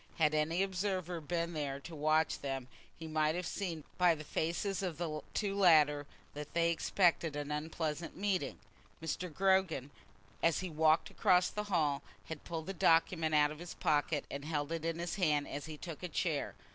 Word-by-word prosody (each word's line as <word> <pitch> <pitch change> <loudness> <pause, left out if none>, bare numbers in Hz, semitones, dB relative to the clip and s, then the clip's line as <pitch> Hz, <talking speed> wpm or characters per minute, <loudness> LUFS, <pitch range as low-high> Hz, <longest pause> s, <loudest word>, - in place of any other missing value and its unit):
Had 155 -2 +3
any 160 +4 +2
observer 185 -3 -2
been 170 +2 -2
there 140 -3 -3
to 165 +3 -9
watch 155 +1 +2
them 135 -2 -4 0.3
he 160 - -7
might 155 0 +1
have 180 0 -2
seen 170 -6 -3 0.2
by 175 -2 +5
the 155 - -8
faces 175 +6 -1
of 180 -5 -3
the 155 -3 -3
two 200 -2 0
latter 150 -6 +5 0.3
that 150 +2 -8
they 170 0 +3
expected 170 -2 +2
an 145 0 -4
unpleasant 155 +1 -3
meeting. 190 -7 -1 0.4
Mr. 165 +2 -3
Gogram, 190 -6 +2 0.5
as 165 0 +3
he 185 - -4
had 155 - -12
walked 160 0 +4
across 180 0 +4
the 210 0 -4
hall, 155 -8 +1 0.3
had 160 -2 -6
pulled 165 -1 -5
a - - -2
document 165 -2 +3
out 150 0 +5
of 155 - -8
his 175 0 -7
pocket, 150 0 +1
and 140 0 -5
held 150 -1 -2
it 165 -1 -3
in 165 0 -1
his 170 +2 -3
hand 150 -6 +2
as 145 +2 -5
he 155 -1 -7
took 165 -1 -7
a 180 - -3
chair. 160 -2 -1
160 Hz, 190 wpm, -34 LUFS, 150-175 Hz, 0.5 s, by